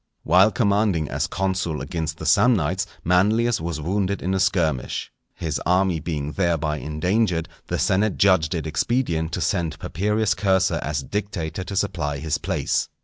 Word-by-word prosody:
_ - - -52 0.2
While 95 +3 +5
commanding 100 - +1
as 70 +4 -1
consul 90 -3 -1
against 80 -2 -4
the - - -7
Samnites, 95 -5 +3 0.2
Manlius 105 +6 +2
was 85 -2 -3
wounded 95 +5 -1
in 95 +2 0
a 95 - +1
skirmish. 85 - 0 0.2
His 80 -3 -3
army 90 -1 +2
being 75 -2 -3
thereby 80 -4 0
endangered, 85 +4 0 0.2
the - - -1
senate 100 +2 +1
judged 95 -4 +3
it 80 - -3
expedient 80 -1 0
to - - -2
send 80 -3 -1
Papirius 105 +6 0
Cursor 95 -1 +1
as 70 -1 -2
dictator 95 -2 -4
to 100 - -6
supply 80 -7 -1
his 75 +1 -2
place. - - -1
90 Hz, 155 wpm, -23 LUFS, 80-100 Hz, 0.2 s, While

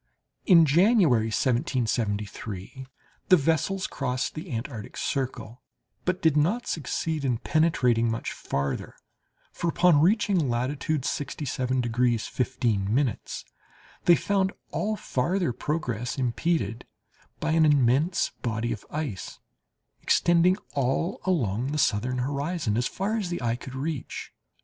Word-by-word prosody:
In 170 -4 +8
January, 160 - +4
1773, 110 -2 -2 0.4
the 185 - +8
vessels 165 +5 0
crossed 125 -2 -2
the 155 - -7
Antarctic 115 -2 -5
circle, 125 -3 -3 0.4
but 185 +1 -1
did 160 -3 +4
not 180 +12 +2
succeed 160 0 -2
in 125 -4 +1
penetrating 125 -6 +2
much 115 +1 -3
farther; 70 0 -3 0.6
for 170 - -3
upon 170 -2 +4
reaching 190 - +3
latitude 135 +4 -1
67 130 -2 -2
degrees 120 -1 +1
15' 120 -1 0 0.9
they 175 - +7
found 195 +1 +1 0.2
all 215 +1 -1
farther 170 - -1
progress 125 -5 -3
impeded 125 - -1 0.5
by 160 - -1
an 160 0 +4
immense 145 +3 +3
body 115 0 -2
of 105 -3 -5
ice, 145 - -4 0.6
extending 175 +2 +3 0.2
all 140 +6 0
along 125 - 0
the 150 +2 -2
southern 125 -1 +1
horizon 140 - -1
as 120 +2 +1
far 205 +4 -2
as 200 -5 -2
the 175 - -3
eye 120 -2 0
could 130 +2 -9
reach. 145 0 -4
135 Hz, 120 wpm, -26 LUFS, 120-165 Hz, 0.9 s, In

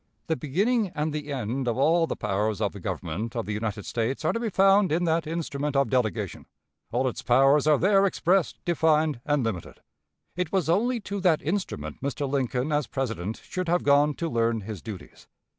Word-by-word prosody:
The 160 - 0
beginning 200 - 0
and 150 +1 -1
the 150 -1 -4
end 130 0 -2
of 120 - 0
all 165 +4 +3
the - - -3
powers 105 +2 -1
of 105 -2 0
the 100 - -8
Government 95 +5 -4
of 115 - -2
the 105 - -3
United 105 -1 -3
States 120 +6 -2
are - - +2
to 230 - -1
be 230 -1 -1
found 195 -1 +4
in 170 +3 +1
that 165 -1 +1
instrument 150 -3 -3
of 140 0 +2
delegation. 125 -7 -1 0.4
All 130 +3 +1
its 125 - -3
powers 135 +4 +4
are 150 -1 +5
there 195 +3 +4
expressed, 185 -1 +1
defined, 155 -5 +2
and 145 -3 +2
limited. 105 -7 -4 0.6
It 180 -2 -2
was 185 -4 0
only 235 +8 +2
to 200 0 -4
that 180 -5 +2
instrument 145 - -3
Mr. 140 +1 -2
Lincoln 130 +1 -1
as 150 -4 +1
President 115 -5 -4
should 185 -2 -4
have 175 +1 +2
gone 145 +1 +4
to 170 - -3
learn 115 -5 0
his 100 -3 -7
duties. 105 -5 -10
145 Hz, 195 wpm, -26 LUFS, 115-170 Hz, 0.6 s, are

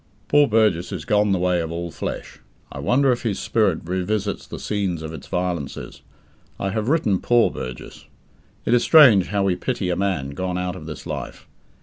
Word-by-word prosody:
Poor 145 0 +5
Burgess 105 -6 +2
is 85 -6 -5
gone 105 -1 +2
the 95 - +2
way 90 -1 +1
of 80 0 -4
all 85 0 -4
flesh. - - -6 0.3
I - - -7
wonder 135 +2 +3
if 120 - -1
his 110 -5 -2
spirit 100 -8 +1
revisits 95 +3 -2
the - - -7
scenes 95 -6 -2
of 80 0 -6
its - - -9
violences? 90 -6 -4 0.6
I 95 - -1
have 110 +3 -2
written 115 - +2
"poor" 120 -1 +3
Burgess. 65 -1 -8 0.6
It - - +2
is 120 - +5
strange 130 - +7
how 100 -1 0
we 95 -2 +2
pity 95 -2 -2
a - - 0
man 90 -8 -1
gone 90 +5 -3
out 90 0 -2
of 80 -4 -9
this 75 - -8
life. - - -6
95 Hz, 195 wpm, -22 LUFS, 90-110 Hz, 0.6 s, strange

